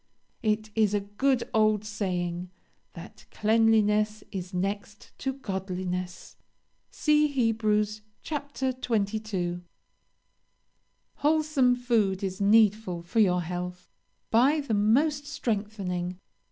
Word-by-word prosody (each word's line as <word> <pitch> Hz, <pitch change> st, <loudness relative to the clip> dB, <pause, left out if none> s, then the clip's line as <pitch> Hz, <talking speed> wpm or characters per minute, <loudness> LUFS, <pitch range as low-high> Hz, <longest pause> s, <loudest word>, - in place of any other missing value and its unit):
It 215 Hz, 0 st, 0 dB
is 210 Hz, -2 st, +2 dB
a -, -, +2 dB
good 235 Hz, +6 st, 0 dB
old 215 Hz, -1 st, +3 dB
saying, 180 Hz, -4 st, -3 dB, 0.4 s
that -, -, -12 dB
cleanliness 215 Hz, -1 st, +2 dB
is 185 Hz, -1 st, -5 dB
next 200 Hz, +2 st, -4 dB
to 270 Hz, -, -1 dB
godliness. 185 Hz, -6 st, -5 dB, 0.5 s
See 300 Hz, -1 st, +3 dB
Heb. 230 Hz, -6 st, 0 dB
x. 210 Hz, 0 st, +1 dB, 0.8 s
22. 200 Hz, -5 st, -1 dB, 1.6 s
"Wholesome 300 Hz, -4 st, +3 dB
food 220 Hz, -6 st, +1 dB
is 190 Hz, 0 st, -3 dB
needful 205 Hz, -4 st, +3 dB
for 175 Hz, +6 st, -1 dB
your 180 Hz, -4 st, +3 dB
health. 180 Hz, +1 st, -6 dB, 0.4 s
Buy 265 Hz, +7 st, +4 dB
the 275 Hz, -6 st, -3 dB
most 285 Hz, +8 st, +2 dB
strengthening. 200 Hz, -, -3 dB
210 Hz, 100 wpm, -27 LUFS, 185-225 Hz, 1.6 s, Buy